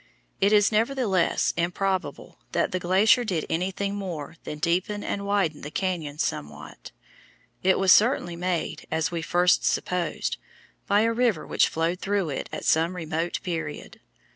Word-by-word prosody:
It 200 +1 +3
is, 205 -1 +5
nevertheless, 220 -5 +1
improbable 185 +2 -2
that - - +1
the 185 - -1
glacier 195 +7 +4
did 180 -8 -2
anything 190 +4 -1
more 170 -7 -5
than 150 - -5
deepen 180 +6 -1
and 200 0 -3
widen 195 -7 0
the 145 - -6
cañon 160 -5 -3
somewhat. 75 - -5 0.7
It 190 0 +3
was 190 -1 +4
certainly 210 -6 +4
made, 180 -1 -3
as 160 +1 -1
we 170 - -2
at 160 - -5
first 180 +1 +3
supposed, 180 -1 -1 0.5
by 205 +1 +4
a 230 +1 +2
river 230 -8 +1
which - - +3
flowed 165 +3 -1
through 195 -6 -1
it - - -4
at - - -6
some 165 +3 +2
remote 165 0 -3
period. 160 -4 -5
180 Hz, 155 wpm, -25 LUFS, 165-200 Hz, 0.7 s, is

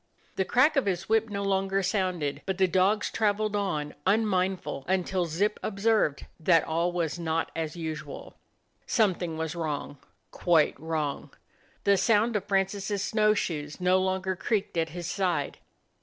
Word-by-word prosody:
The 190 - 0
erack 280 +6 +4
of 270 - +2
his 185 -1 -1
whip 225 0 +2
no 200 -1 -3
longer 195 0 +1
sounded, 185 -6 -1
but 190 -1 -1
the 190 -1 +4
dogs 190 +4 +2
traveled 210 0 0
on 155 -8 -2
unmindful 190 -7 +1
until 185 -1 0
Zip 200 +7 0
observed 205 -7 +1
that 165 0 +4
all 170 +2 0
was 175 -1 -2
not 165 -1 -1
as 160 -1 -3
usual. 160 -2 -6 0.5
Some 215 -6 +3
thing 170 -2 -5
was 160 -1 -3
wrong; 150 -4 -4 0.3
quite 165 -4 +3
wrong. 155 -2 -3 0.5
The 200 0 +4
sound 225 +3 +3
of 210 - -1
Francis' 195 0 0
snow 215 +1 +2
r 215 - +4
shoes 150 -6 -3
no 180 +1 +3
longer 190 0 -1
creaked 205 +1 -1
at 165 -1 0
his 175 +2 -6
side. 175 -5 -1
185 Hz, 155 wpm, -28 LUFS, 165-200 Hz, 0.5 s, erack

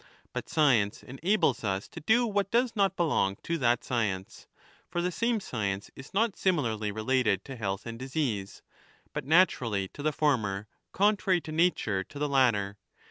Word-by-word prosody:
But - - -5
science 120 -10 +2
enables 140 - 0
us 95 -1 -1
to - - -9
do 220 +10 +3
what 200 -3 0
does 240 +1 +1
not 195 -2 +2
belong 145 - +1
to 170 0 -2
that 120 -2 +2
science; 100 -7 -2 0.4
for 175 - -2
the 180 +1 0
same 230 +4 0
science 100 - -3
is 135 - -11
not 210 +1 +1
similarly 115 - 0
related 110 -2 +1
to 135 - -7
health 100 -4 -3
and 115 0 -6
disease, 130 -7 -3 0.5
but - - -4
naturally 125 - +3
to 145 - -10
the 155 +1 +1
former, 110 -10 0 0.2
contrary 195 -2 +2
to 160 - -8
nature 155 - +1
to - - -12
the 150 +1 0
latter. 110 -8 +2
135 Hz, 165 wpm, -29 LUFS, 105-175 Hz, 0.5 s, do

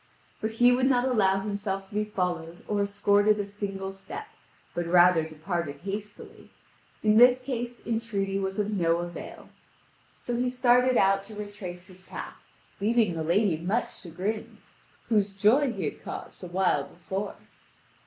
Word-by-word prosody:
But 220 +1 -2
he 245 +2 +5
would 255 +1 +3
not 250 -2 +3
allow 195 -6 +3
himself 200 -1 -3
to - - -16
be 210 +1 +1
followed 175 -4 -3
or 205 -1 0
escorted 205 +1 +3
a 205 - -1
single 195 -1 -5
step, 195 - -8 0.5
but 175 -1 -2
rather 175 -1 +6
departed 155 -2 -4
hastily: 205 +1 -7 0.5
in 215 0 +4
this 250 +2 +7
case 245 -2 -4
entreaty 205 -4 -1
was 195 0 -3
of 210 0 0
no 170 -4 +2
avail. 175 0 -7 0.7
So 245 - -3
he 250 +1 +1
started 250 0 +4
out 195 0 +3
to 215 +1 -11
retrace 205 -4 -7
his 185 -1 -16
path, - - -7 0.5
leaving 215 -2 +2
the 165 - -3
lady 175 +2 +2
much 195 +9 -2
chagrined, 190 +5 -5 0.5
whose 205 -3 +2
joy 240 +8 +4
he - - -3
had - - -4
caused - - -8
a - - -5
while 175 -5 +1
before. 190 +3 -5
200 Hz, 155 wpm, -27 LUFS, 180-220 Hz, 0.7 s, this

